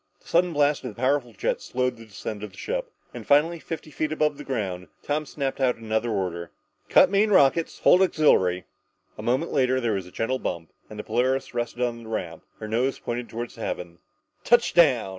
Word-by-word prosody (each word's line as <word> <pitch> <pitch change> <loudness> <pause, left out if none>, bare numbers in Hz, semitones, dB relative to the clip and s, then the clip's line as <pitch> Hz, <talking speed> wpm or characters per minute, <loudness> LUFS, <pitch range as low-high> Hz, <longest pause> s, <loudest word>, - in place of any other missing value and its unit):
The - - -25
sudden 175 +1 +3
blast 145 -1 +2
of 120 -5 -6
the - - -14
powerful 130 -1 +1
jets 110 - -2
slowed 125 0 -1
the 115 -1 -13
descent 105 +1 -6
of 105 - -5
the - - -16
ship, - - -3 0.2
and - - -7
finally, 160 +4 +3
fifty 160 -1 -7
feet 155 +2 -2
above 150 -2 0
the - - -6
ground, 95 -8 -3 0.2
Tom 150 +1 -2
snapped 135 -1 -3
out 125 -2 +3
another 110 +1 -2
order. 90 -5 -2 0.4
"Cut 185 - +6
main 205 +2 +3
rockets! 165 -3 +3
Hold 180 - +6
auxiliary!" 95 - +3 0.5
A - - -3
moment 130 +7 0
later 130 -1 +2
there 120 -3 0
was 95 -2 -3
a - - -13
gentle 130 +6 -1
bump 85 -7 -4 0.2
and 110 - -10
the 105 - -5
Polaris 130 +5 0
rested 120 0 -2
on 120 -1 -2
the 110 - -11
ramp, 85 -7 -4
her 110 - -7
nose 120 +5 0
pointed 120 0 -5
to 115 +1 -4
the 115 - -13
heavens. 85 -5 -5 0.4
"_Touchdown! 170 - +4
125 Hz, 205 wpm, -25 LUFS, 110-150 Hz, 0.5 s, Cut